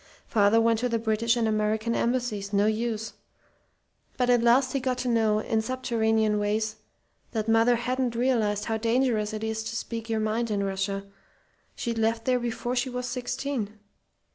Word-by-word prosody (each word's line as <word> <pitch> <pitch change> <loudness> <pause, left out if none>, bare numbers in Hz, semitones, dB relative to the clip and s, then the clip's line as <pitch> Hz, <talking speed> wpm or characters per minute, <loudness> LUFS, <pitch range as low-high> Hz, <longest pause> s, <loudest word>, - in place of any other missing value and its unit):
Father 210 +1 +3
went 230 -1 +3
to 250 +1 0
the 230 - +1
British 230 +1 +1
and 230 -1 +1
American 215 +1 0
Embassies; 235 -5 -1
no 200 0 +3
use! 220 0 -1 1.0
But 250 -1 +2
at 245 -1 +4
last 255 +3 +4
he 275 - +1
got 255 -1 -1
to 250 - -3
know, 220 -3 +2
in 220 +1 0
subterranean 220 -3 +1
ways, 215 +1 -1 0.6
that 220 -1 -2
mother 225 +2 +4
hadn't 250 0 -1
realized 230 -4 +1
how 225 -1 -1
dangerous 230 -1 +1
it 215 0 -5
is 220 0 -2
to 230 - -4
speak 230 0 -5
your 225 -1 0
mind 220 +2 -1
in 205 -2 0
Russia. 195 0 -2 0.7
She'd 230 -1 -3
left 225 +1 0
there 255 -1 +2
before 240 +1 -3
she 255 +1 0
was 250 0 -4
sixteen! 250 -3 -3
225 Hz, 170 wpm, -27 LUFS, 215-245 Hz, 1.0 s, at